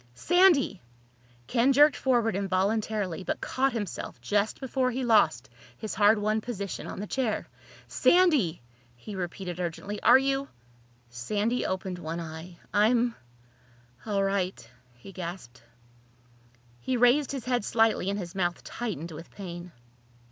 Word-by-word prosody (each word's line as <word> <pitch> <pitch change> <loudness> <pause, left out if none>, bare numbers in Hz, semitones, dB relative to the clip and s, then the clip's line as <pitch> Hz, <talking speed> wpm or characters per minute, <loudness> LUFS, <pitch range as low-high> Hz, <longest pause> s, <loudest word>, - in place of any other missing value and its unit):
"Sandy!" 350 - +3 0.6
Ken 245 - +2
jerked 295 +2 +6
forward 235 -5 +1
involuntarily 195 -1 -1
but - - -3
caught 270 +1 0
himself 205 - -5
just 205 - 0
before 260 -1 0
he 255 +1 -2
lost 170 - +3 0.3
his 220 - -5
hard 210 +1 +5
won 215 +1 0
position 200 -5 -5
on - - -7
the 205 - -3
chair. 235 -1 -2 0.4
"Sandy!" 290 - +3 0.3
he 120 - -9
repeated 180 -1 -5
urgently. 180 +4 -4
"Are - - +7
you—?" 270 +1 0 0.6
Sandy 205 - -1
opened 185 -1 -3
one 165 0 -4
eye. 165 +1 -8 0.2
"I'm—all 125 - -2
right," 195 - -1 0.3
he 120 +11 -12
gasped. 170 -10 -8 1.2
He 255 - -1
raised 250 +4 +4
his 270 -5 -5
head 245 -3 0
slightly 225 -4 +2
and 200 - -1
his 175 -4 -6
mouth 175 -2 -1
tightened 185 -9 -5
with 165 +2 -10
pain. 175 -2 -8
200 Hz, 130 wpm, -28 LUFS, 175-240 Hz, 1.2 s, Are